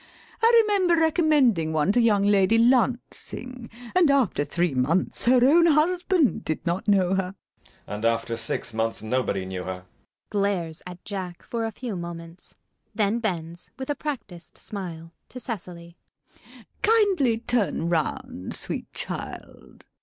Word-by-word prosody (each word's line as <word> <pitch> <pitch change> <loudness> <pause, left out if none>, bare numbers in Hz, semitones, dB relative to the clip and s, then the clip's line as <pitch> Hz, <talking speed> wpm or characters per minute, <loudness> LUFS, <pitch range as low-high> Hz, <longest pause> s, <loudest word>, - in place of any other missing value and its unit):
I 460 0 +6
remember 385 -5 +3
recommending 295 - +3
one 155 +4 +2
to 240 - +3
young 210 -4 +3
Lady 205 +1 +4
Lancing, 245 0 0 0.2
and 365 -4 +4
after 265 - +2
three 175 +1 -1
months 140 +8 0
her 250 0 +5
own 335 +4 +6
husband 335 - +2
did 155 - -3
not 175 +4 -2
know 190 -3 +3
her. 190 0 -1 0.3
JACK. - - -27
And 105 +1 -6
after 115 0 0
six 115 0 -4
months 115 0 -2
nobody 110 -5 -1
knew 95 -1 -5
her. 95 - -3
LADY 90 0 -8
BRACKNELL. - - -41
[Glares 195 -6 -1
at 180 0 -11
Jack 185 -4 -6
for 230 -1 -3
a 225 - -3
few 230 -1 -6
moments. 170 0 -8 0.4
Then 215 +1 +1
bends, 170 -6 -4
with 265 +2 -4
a - - -1
practised 230 - -7
smile, 170 -5 -7 0.2
to 250 - -8
Cecily.] 175 -7 -7 0.8
Kindly 395 - +3
turn 225 -7 -1
round, 155 - -2
sweet - - -5
child. - - -8
200 Hz, 145 wpm, -25 LUFS, 165-255 Hz, 0.8 s, I